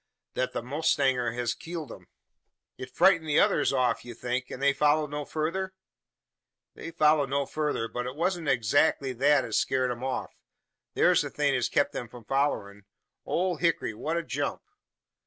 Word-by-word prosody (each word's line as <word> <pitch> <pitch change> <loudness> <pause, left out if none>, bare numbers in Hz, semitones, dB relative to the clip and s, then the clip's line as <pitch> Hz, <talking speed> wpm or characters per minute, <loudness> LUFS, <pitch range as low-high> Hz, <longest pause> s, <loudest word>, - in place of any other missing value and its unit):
"That 130 - -2
the - - -3
mowstanger 135 -4 +1
hes 120 -1 -1
killed 165 -6 -7
him." - - -12 0.7
"It 130 - -8
frightened 165 +3 +3
the 145 - +4
others - - +3
off, 130 -2 +1
you 120 -1 -9
think, 125 +2 -3
and - - -7
they 140 0 +3
followed 150 +1 +2
no 145 0 -4
further?" 185 +6 -3 1.0
"They - - -8
follered 150 -3 +3
no 140 +1 0
further; 150 -6 -2
but 125 +1 -4
it 130 - -6
wa'n't 170 0 -1
adzackly 130 +3 +2
thet 145 +4 +3
as - - 0
scared 130 -1 0
'em 120 +1 -6
off. 130 -1 -3 0.6
Thur's - - +4
the - - -4
thing 145 -2 +1
as 125 -2 0
kep 145 - +2
them 120 - -5
from 120 0 -13
follerin'. 105 -8 -1 0.4
Ole 180 -1 0
Hickory, 165 -8 0
what 155 +9 -3
a 170 - -1
jump!" - - -3
140 Hz, 175 wpm, -28 LUFS, 125-155 Hz, 1.0 s, the